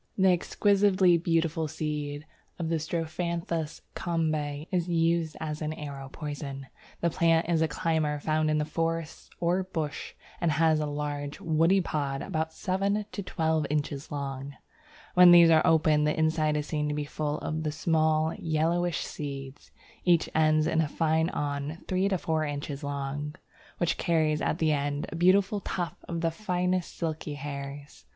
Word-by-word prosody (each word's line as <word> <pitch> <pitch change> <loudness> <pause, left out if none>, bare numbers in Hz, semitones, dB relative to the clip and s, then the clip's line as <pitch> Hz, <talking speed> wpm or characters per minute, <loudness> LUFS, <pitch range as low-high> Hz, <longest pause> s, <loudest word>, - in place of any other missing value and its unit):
The 190 -1 +5
exquisitely 190 -1 +3
beautiful 165 -1 0
seed 150 -1 -4 0.3
of 165 -2 -3
Strophanthus 165 0 -3
Kombe 155 -4 -1
is 180 -2 0
used 165 -1 +1
as 155 0 -4
an 155 0 -2
arrow 140 -3 -7
poison. 145 -3 -6 0.4
The 170 - +2
plant 165 0 +3
is 165 -2 +2
a 160 - +3
climber 155 -1 0
found 155 +1 +1
in 155 0 +1
forests 165 0 -3
or 175 +2 +2
bush, 160 -5 -4 0.3
and 170 -3 +2
has 160 0 +3
large 145 -1 -3
woody 165 +4 +3
pods 140 -5 -2
about 160 -4 -2
seven 200 +4 -1
to 200 - -4
twelve 160 -5 0
inches 145 -1 -2
long. 140 -1 -5 0.6
When 180 0 +8
these 170 -1 +8
are 160 -1 +6
open, 155 -2 +4
the 150 - +1
inside 155 -1 +2
is 150 - -2
seen 150 -1 -1
to 150 - -1
be 150 0 -2
full 150 0 -2
of 155 +1 -3
the 155 -1 -1
small 155 0 +1
yellowish 165 +1 0
seeds; 140 -2 -7 0.3
each 175 -2 +3
ends 155 0 +3
in 160 0 +2
a 155 - 0
fine 160 +2 +1
awn 145 +1 -3
three 185 +1 +1
to 190 - +1
four 160 -2 -1
inches 145 -1 -4
long, 145 +1 -4 0.4
which 175 - 0
carries 155 -2 +1
at - - 0
the 160 -2 +2
end 145 0 -1
a - - -6
beautiful 190 +4 +3
tuft 175 -3 -4
of 170 -1 -2
the 165 -1 +1
finest 180 -1 -1
silky 160 -3 -3
hairs. 140 - -7
155 Hz, 160 wpm, -28 LUFS, 150-170 Hz, 0.6 s, When